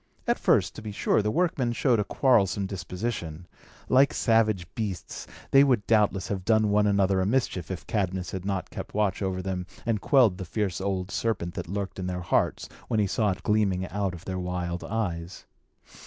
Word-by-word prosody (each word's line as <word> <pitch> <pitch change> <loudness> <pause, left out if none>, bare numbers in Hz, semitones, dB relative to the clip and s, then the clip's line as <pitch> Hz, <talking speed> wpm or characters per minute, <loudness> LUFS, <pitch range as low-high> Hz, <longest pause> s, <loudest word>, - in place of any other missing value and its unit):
At - - +1
first, - - +3
to - - -9
be 110 -1 -6
sure, 100 - +1
the 105 - 0
workmen 145 -5 +1
showed 120 -2 +2
a - - +2
quarrelsome 100 -5 +2
disposition. 90 -3 -5 0.4
Like 135 +2 +4
savage 110 -6 +2
beasts, 100 -6 -5 0.2
they 135 0 +7
would 125 -8 +2
doubtless 105 -4 +2
have 95 -2 -3
done 110 0 +3
one 105 0 +3
another 100 -2 +2
a - - +1
mischief, 105 - 0
if 95 -2 -5
Cadmus 95 -3 -2
had 95 -1 -5
not 95 -1 -3
kept - - -7
watch 105 -2 +1
over 95 -1 -2
them 90 -1 -3 0.2
and 115 -3 0
quelled 120 -10 +4
the - - -3
fierce 95 0 -2
old 95 -1 -2
serpent 95 -7 -1
that - - -5
lurked 100 0 -4
in 90 - -3
their 90 0 -3
hearts, 90 - 0 0.2
when 110 - 0
he 105 - +3
saw 105 +2 +1
it 90 -1 -3
gleaming 100 -4 +1
out 100 -2 -2
of 85 - -12
their 95 -1 -3
wild 90 -1 -3
eyes. 90 -5 -4
100 Hz, 195 wpm, -27 LUFS, 90-110 Hz, 0.4 s, they